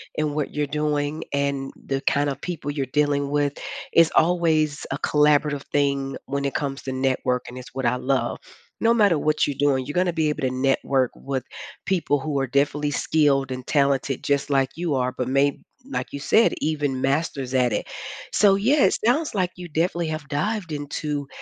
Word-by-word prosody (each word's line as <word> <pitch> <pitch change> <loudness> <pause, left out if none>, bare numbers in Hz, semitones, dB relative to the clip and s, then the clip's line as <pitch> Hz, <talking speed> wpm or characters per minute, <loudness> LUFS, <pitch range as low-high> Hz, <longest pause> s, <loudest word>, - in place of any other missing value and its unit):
in 150 -1 -1
what 150 -2 -2
you're 150 -1 -1
doing 150 0 -1
and 140 -1 -1
the 135 0 -2
kind 145 0 +1
of 135 0 -4
people 165 -5 -4
you're 145 -2 -1
dealing 145 0 +1
with, 145 -1 0 0.4
is 165 -1 +6
always 160 -3 +2
a 135 - -2
collaborative 150 -1 +2
thing 140 -1 0
when 140 +1 -2
it 140 - -1
comes 140 -2 -3
to 135 - -4
networking- 130 -1 0 0.2
it's 125 -1 -10
what 130 -1 -3
I 120 +1 +3
love. 130 +1 0 0.4
No 230 +1 +4
matter 205 -8 +4
what 155 +1 +1
you're 145 - -2
doing, 135 -2 +2
you're 145 - -4
gonna 180 -1 +2
be 160 -2 +1
able 150 - -3
to 125 - -2
network 135 -1 +1
with 135 -2 -4 0.4
people 170 -6 +1
who 140 0 -2
are 135 - 0
definitely 145 +3 +1
skilled 140 -3 +2
and 130 -1 -5
talented 140 -2 +1
just 140 0 0
like 135 -1 +3
you 170 -2 -1
are, 125 0 0
but 125 - -1
may 140 +1 +1 0.3
like - - -3
you 140 - -5
said, 225 +10 +4
even 145 -4 -1
masters 135 -2 -1
at 125 -2 +3
it. 105 - -2 0.5
So, 200 -2 +5
yes, 260 +8 +3
it 220 - 0
sounds 295 +4 +2
like 185 -3 0
you 180 -1 -9
definitely 170 +1 0
have 155 -2 -4
dived 180 +4 -2
into 145 0 -3
145 Hz, 190 wpm, -24 LUFS, 135-155 Hz, 0.5 s, is